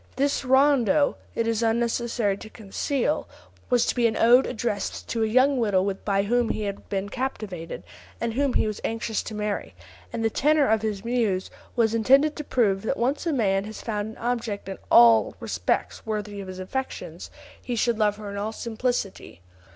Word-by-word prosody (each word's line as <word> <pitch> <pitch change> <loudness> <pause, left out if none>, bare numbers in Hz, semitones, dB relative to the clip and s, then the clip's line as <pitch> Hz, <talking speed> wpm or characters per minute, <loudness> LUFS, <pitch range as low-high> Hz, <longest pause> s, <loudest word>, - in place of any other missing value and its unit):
This 280 +2 0
rondo, 275 +1 +4 0.2
it 230 - 0
is 230 -1 0
unnecessary 230 -2 0
to 215 - -10
conceal, 245 +7 -2 0.4
was 245 -2 +3
to - - +1
be 240 -2 +3
an 220 - -2
ode 245 +3 +6
addressed 215 -3 -3
to 230 - -1
a 220 - +2
young 255 +4 +3
widow 200 -3 +2
by 195 0 -1
whom 240 +2 +1
he 215 - -2
had 200 -1 -5
been 195 0 -2
captivated, 200 -8 -5 0.4
and 230 -1 -2
whom 275 +1 +1
he - - +3
was 215 -1 -4
anxious 225 -1 -2
to 220 - -7
marry, 210 -1 -3 0.4
and 230 -1 -2
the 225 - +2
tenor 300 +2 +3
of 220 -1 +2
his 215 -1 -3
muse 225 -6 0 0.2
was 230 -2 +2
intended 270 +7 +4
to 300 - -4
prove 205 -8 +1
that 225 - -2
when 245 +3 +2
once 295 - -8
a - - +2
man 200 -7 +1
has 215 +1 -8
found 210 -2 -2
an 220 - -11
object 230 -5 -3
in 195 - -6
all 115 -3 +6
respects - - -2
worthy 210 -2 -4
of 195 - -8
his 185 0 -7
affections, 260 +9 -5 0.3
he 245 - -3
should 230 0 +1
love 210 -1 +2
her 210 -1 -7
"in 200 - -6
all 210 +2 -2
simplicity." 230 - -3
225 Hz, 190 wpm, -25 LUFS, 205-245 Hz, 0.4 s, ode